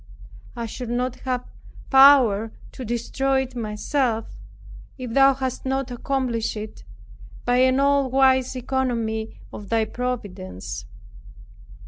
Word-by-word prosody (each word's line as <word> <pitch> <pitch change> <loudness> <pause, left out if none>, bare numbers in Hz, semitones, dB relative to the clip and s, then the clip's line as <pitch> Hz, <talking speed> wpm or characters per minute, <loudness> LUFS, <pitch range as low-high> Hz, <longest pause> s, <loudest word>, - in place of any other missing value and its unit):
I 235 - -4
should 235 +2 -6
not 250 +1 -1
have 255 -2 -2
had - - -20
power 260 -6 +6 0.2
to 260 - -8
destroy 265 +3 0
it 260 -1 -11
myself, 225 +1 -2 0.6
if 250 -3 -6
thou 275 +1 +6
hadst 260 -1 -4
not 265 -1 -2
accomplished 245 -3 -2
it 215 0 -8 0.6
by 245 0 +2
an 260 +1 +4
all 280 -1 +3
wise 260 0 +3
economy 235 -4 -2
of 205 -2 -9
thy 225 -1 +2
providence. 100 - -5
250 Hz, 120 wpm, -23 LUFS, 225-265 Hz, 0.6 s, power